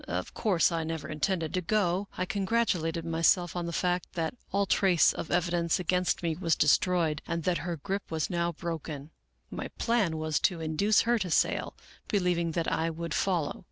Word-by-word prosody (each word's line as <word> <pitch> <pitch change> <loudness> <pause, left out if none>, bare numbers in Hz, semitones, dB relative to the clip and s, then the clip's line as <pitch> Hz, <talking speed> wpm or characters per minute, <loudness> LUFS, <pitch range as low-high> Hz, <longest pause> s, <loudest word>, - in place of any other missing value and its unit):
Of - - -3
course 185 -6 +2
I 165 -1 -1
never 160 -2 -4
intended 160 +1 -1
to 185 - 0
go. 195 0 0
I 185 - 0
con 200 +1 -2
gratulated 180 -7 0
myself 165 +2 +2
on 175 -1 -2
the - - -3
fact 180 +1 -1
that 165 -3 -2 0.2
all 200 +1 +2
trace 185 -3 +4
of - - -6
evidence 175 -1 +1
against 180 +1 0
me 165 -2 0
was 165 -2 +1
destroyed 160 0 +2
and 170 -1 -2
that 180 0 +1
her 170 -1 -3
grip 195 +6 -4
was 160 -2 -1
now 170 -1 0
broken. 160 -3 -6 0.4
My - - -4
plan 220 -9 +1
was 155 -2 0
to 180 -4 +1
induce 160 +7 +2
her 235 0 +2
to 190 -3 -2
sail, - - +1 0.3
believing 175 -4 0
that 170 0 -1
I 165 +1 0
would 165 0 -5
follow. 175 -6 0
170 Hz, 190 wpm, -29 LUFS, 160-185 Hz, 0.4 s, trace